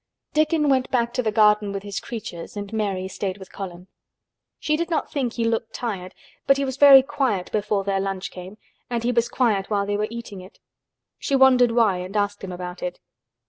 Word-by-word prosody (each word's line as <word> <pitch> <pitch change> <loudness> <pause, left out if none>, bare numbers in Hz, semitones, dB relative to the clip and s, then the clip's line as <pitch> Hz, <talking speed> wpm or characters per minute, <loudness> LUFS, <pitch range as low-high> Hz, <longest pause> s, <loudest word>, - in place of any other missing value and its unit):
Dickon 310 0 +2
went 260 -2 +2
back 235 -2 0
to - - 0
the 220 -3 -1
garden 210 -1 +4
with 195 0 -5
his 200 -2 -4
creatures 205 -5 -7
and 205 +1 -6
Mary 195 -4 -1
stayed 190 0 -4
with 190 -2 -12
Colin. 180 -2 -8 0.7
She 305 - 0
did 335 +2 -2
not 325 - -1
think 255 -5 -1
he 235 - -2
looked 230 0 -1
tired 195 -6 -5 0.3
but 275 - +5
he 275 - 0
was 260 -1 -3
very 275 -2 +9
quiet 255 -9 -1
before 210 -1 0
their 195 0 0
lunch 195 -1 -3
came 185 +3 -10 0.3
and 235 -1 -2
he 245 - +1
was 235 0 +1
quiet 210 -6 +1
while 200 -2 0
they 205 0 -1
were 210 +1 -1
eating 230 -4 -8
it. 185 +4 -15 0.6
She 280 - 0
wondered 260 -2 +6
why 225 -6 +3
and 185 +3 -5
asked 205 0 -1
him 190 - -5
about 180 0 -7
it. 180 0 -4
210 Hz, 210 wpm, -23 LUFS, 195-245 Hz, 0.7 s, very